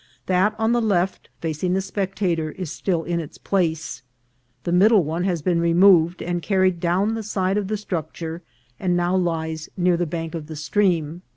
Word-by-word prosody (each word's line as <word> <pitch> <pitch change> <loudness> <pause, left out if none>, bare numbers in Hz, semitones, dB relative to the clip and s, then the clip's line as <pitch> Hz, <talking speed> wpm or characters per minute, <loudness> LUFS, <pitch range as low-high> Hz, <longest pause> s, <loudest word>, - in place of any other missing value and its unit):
That 190 +4 +2
on 225 +1 +1
the 240 0 +2
left, 195 -4 0
facing 165 +3 -1
the - - +2
spectator, 190 -5 -2
is 180 -5 -6
still 170 -1 -1
in 170 +1 -1
its 155 -3 -8
place. 160 -8 -1 0.6
The 170 - -2
middle 200 +2 +5
one 165 +4 -2
has 175 -5 -1
been 170 -1 +2
removed 170 0 +4
and 175 0 -2
carried 185 -2 +2
down 185 +6 +1
the 225 - -3
side 195 -2 -1
of 205 -2 -1
the 215 +1 -1
structure, 170 -3 -5 0.4
and 180 -1 +1
now 175 +1 +1
lies 160 -3 -1
near 180 -1 +3
the 175 0 -1
bank 165 0 -4
of 160 -3 -5
the 160 - -7
stream. 165 +1 0
175 Hz, 185 wpm, -23 LUFS, 165-190 Hz, 0.6 s, middle